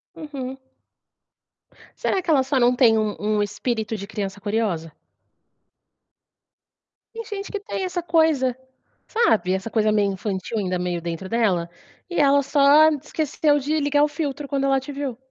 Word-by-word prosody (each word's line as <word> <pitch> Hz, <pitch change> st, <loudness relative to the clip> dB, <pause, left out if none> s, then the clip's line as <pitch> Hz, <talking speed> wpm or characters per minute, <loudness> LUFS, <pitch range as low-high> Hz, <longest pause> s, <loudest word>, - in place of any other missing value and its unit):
Uhum. 270 Hz, -4 st, -6 dB, 1.4 s
Será 380 Hz, -, 0 dB
que 345 Hz, -, -7 dB
ela 275 Hz, -4 st, +4 dB
só 265 Hz, 0 st, 0 dB
não 245 Hz, +1 st, +4 dB
tem 235 Hz, -3 st, +5 dB
um 215 Hz, -1 st, 0 dB
um 210 Hz, 0 st, 0 dB
"espírito 220 Hz, +2 st, -2 dB
de 200 Hz, -, -6 dB
criança 200 Hz, -1 st, -5 dB
curiosa"? 205 Hz, -6 st, -2 dB, 2.2 s
Tem 460 Hz, 0 st, -5 dB
gente 400 Hz, -1 st, -6 dB
que 410 Hz, -, -3 dB
tem 405 Hz, -2 st, -5 dB
essa 360 Hz, -1 st, -3 dB
coisa, 315 Hz, -7 st, +2 dB, 0.5 s
sabe, 225 Hz, -, +2 dB
essa 190 Hz, +4 st, -3 dB
coisa 215 Hz, -1 st, +2 dB
meio 205 Hz, -2 st, +2 dB
infantil 195 Hz, +3 st, -4 dB
ainda 185 Hz, -3 st, -1 dB
meio 175 Hz, -1 st, -2 dB
dentro 170 Hz, +2 st, -5 dB
dela, 195 Hz, -8 st, +1 dB, 0.4 s
e 350 Hz, -, -2 dB
ela 280 Hz, -1 st, +5 dB
só 285 Hz, +2 st, +5 dB
esqueceu 300 Hz, 0 st, 0 dB
de 300 Hz, +3 st, -1 dB
ligar 290 Hz, 0 st, +2 dB
o 300 Hz, -, +4 dB
filtro 295 Hz, -2 st, -4 dB
quando 275 Hz, -1 st, -1 dB
ela 270 Hz, -1 st, +3 dB
te 265 Hz, +2 st, -8 dB
viu. 275 Hz, -4 st, -4 dB
260 Hz, 155 wpm, -23 LUFS, 205-295 Hz, 2.2 s, tem